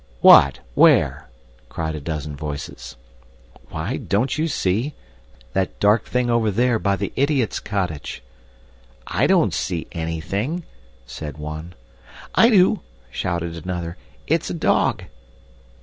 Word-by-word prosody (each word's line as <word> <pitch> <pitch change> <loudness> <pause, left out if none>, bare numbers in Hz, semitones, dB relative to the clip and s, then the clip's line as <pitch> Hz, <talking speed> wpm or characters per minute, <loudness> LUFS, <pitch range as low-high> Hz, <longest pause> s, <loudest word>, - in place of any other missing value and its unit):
"What? - - +7
Where?" - - +4 0.4
cried 80 -1 -3
a 75 - -4
dozen 75 -1 -4
voices. 70 -4 -7 0.7
"Why, - - -3
don't 120 +7 0
you 155 +2 0
see? 120 - -1 0.6
That 95 -1 -1
dark 105 +3 +3
thing 125 -1 0
over 115 -2 +2
there 120 +3 +2
by 100 -1 +1
the 100 +1 -4
idiot's 140 -4 +1
cottage." 90 - -4 0.8
"I - - +1
don't - - +3
see 85 -4 -2
anything," 95 - -3 0.4
said 75 +5 -7
one. 75 +3 -7 0.6
"I 230 - +6
do," 195 -2 +4 0.3
shouted 85 +1 -3
another. 85 -2 -4 0.3
"It's - - 0
a - - -3
dog." - - +1
95 Hz, 120 wpm, -22 LUFS, 80-120 Hz, 0.8 s, What